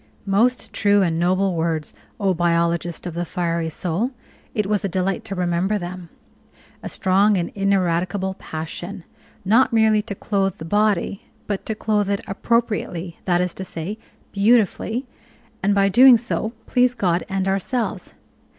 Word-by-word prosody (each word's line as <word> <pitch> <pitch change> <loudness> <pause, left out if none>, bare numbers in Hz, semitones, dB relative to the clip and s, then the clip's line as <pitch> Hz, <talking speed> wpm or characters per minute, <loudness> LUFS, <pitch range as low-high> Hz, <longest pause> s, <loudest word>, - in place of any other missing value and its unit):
Most 225 +6 +1
true 205 -1 +3
and 165 -2 0
noble 185 +2 +2
words, 160 -2 -1 0.3
O 195 -2 +2
biologist 170 0 0
of 175 - -4
the 170 +1 -2
fiery 170 -1 -2
soul! 180 +8 -1 0.5
It 210 -3 +1
was 205 0 0
a 195 - -1
delight 185 +1 -1
to 200 -3 -4
remember 180 +3 0
them. 180 -2 -7 0.7
A - - -6
"strong 195 +2 +3
and 170 -1 -2
ineradicable 190 -1 0
passion," 175 +4 -6 0.4
not 230 +7 +4
merely 220 -2 +4
to 210 -2 -6
clothe 195 -2 -1
the 160 - -8
body, 205 +1 0 0.2
but 205 -2 -4
to 220 - -2
clothe 210 -2 0
it 200 0 0
appropriately, 200 -5 -1
that 175 -1 +2
is 180 -1 -1
to 190 - -6
say, 190 +4 -6 0.3
beautifully, 220 +3 +2 0.6
and 200 +1 +2
by 195 0 +4
so 195 - +1
doing 250 +3 +8 0.5
please 250 -1 +2
God 175 -6 +1
and 195 0 -1
ourselves. 200 +5 -2
195 Hz, 150 wpm, -22 LUFS, 175-210 Hz, 0.7 s, doing